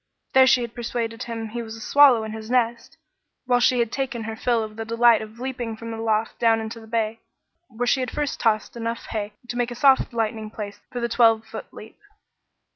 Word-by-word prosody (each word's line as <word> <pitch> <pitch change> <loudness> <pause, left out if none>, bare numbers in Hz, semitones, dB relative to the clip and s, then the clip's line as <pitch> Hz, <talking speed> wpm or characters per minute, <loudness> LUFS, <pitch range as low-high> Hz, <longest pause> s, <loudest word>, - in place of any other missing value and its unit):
There 265 0 +7
she 260 -1 +5
had 235 -1 -5
persuaded 235 -1 -4
him 225 -2 -5
he 235 +2 -4
was 225 -1 -7
a - - -10
swallow 250 -1 +5
in 220 - -5
his 220 0 -8
nest, 240 -2 0 0.5
while 245 -1 +3
she 250 +1 +3
had 235 -1 +1
taken 260 -4 -3
her 220 0 -5
fill 235 0 +1
of 215 -1 -8
the 225 - -4
delight 230 0 +4
of 220 +1 -10
leaping 245 -3 -4
from 230 0 -7
the 225 - -5
loft 225 0 -1
down 225 -1 +4
into 220 +1 -6
the 220 - -14
bay, 225 0 -1 0.5
where 240 -2 -3
she 255 +2 +2
had 255 - -2
first 295 -1 -3
tossed 220 -1 +1
enough 230 0 -4
hay 210 -1 -3
to 240 - -5
make 245 0 0
a 240 - -6
soft 265 +1 +4
lighting 220 -2 -2
place 205 -2 -7
for 245 - -4
the 235 - 0
twelve 225 -1 +3
foot 220 0 -9
leap. 220 - -13
230 Hz, 225 wpm, -24 LUFS, 220-245 Hz, 0.5 s, There